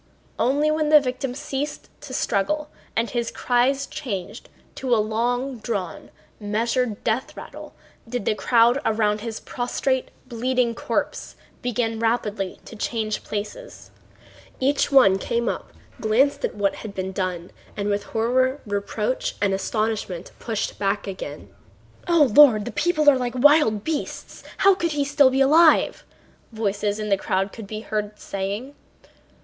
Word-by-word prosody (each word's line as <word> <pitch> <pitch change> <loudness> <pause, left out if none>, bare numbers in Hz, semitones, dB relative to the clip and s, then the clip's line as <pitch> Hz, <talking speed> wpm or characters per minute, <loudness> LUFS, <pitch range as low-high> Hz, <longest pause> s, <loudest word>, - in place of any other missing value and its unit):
Only 290 +4 +2
when 310 -1 0
the 305 0 +8
victim 255 -1 -3
ceased 280 +1 -4
to 290 -2 -10
struggle 295 +7 -1 0.2
and 230 +1 +1
his 235 -1 -1
cries 260 +3 +1
changed 220 - -6 0.2
to 255 -3 0
a - - +2
long 240 +4 -1
drawn, 200 -6 -4 0.3
measured 225 +2 -1
death 235 +3 -1
rattle - - -10 0.3
did 245 -4 -3
the - - +2
crowd 235 +4 +3
around 215 -1 +1
his 225 -1 -5
prostrate, 255 +1 -2 0.2
bleeding 245 0 0
corpse - - -3 0.3
begin 230 -2 -1
rapidly 215 -4 -1
to - - -10
change 215 -1 -2
places. 355 - -7 0.7
Each 280 +2 +1
one 200 -9 +6
came 235 +4 -1
up, - - -3 0.3
glanced 250 +6 +2
at - - -1
what 200 -1 0
had 210 -2 -8
been 190 0 -3
done, 185 -2 -3 0.3
and 205 0 -2
with 205 0 -1
horror, 255 +4 +1
reproach, 210 +3 -2
and 200 -1 +1
astonishment 205 -2 -2
pushed 225 -3 -3
back 200 0 0
again. 185 -7 -7 0.5
"O 340 -3 +5
Lord! 245 -9 +7
The 240 - -4
people 305 +3 +1
are 275 -3 +7
like 245 0 -3
wild 255 -6 +4
beasts! 320 -2 -4 0.2
How 395 0 +6
could 340 -4 -1
he 285 -1 0 0.2
be 265 +1 +1
alive?" 310 +4 +5 0.5
voices 205 -2 -1
in 215 -1 -4
the 195 - +3
crowd 195 +1 -1
could 220 -3 -9
be 215 +1 -5
heard 210 -1 -3
saying. 200 +8 -4
230 Hz, 145 wpm, -23 LUFS, 210-265 Hz, 0.7 s, the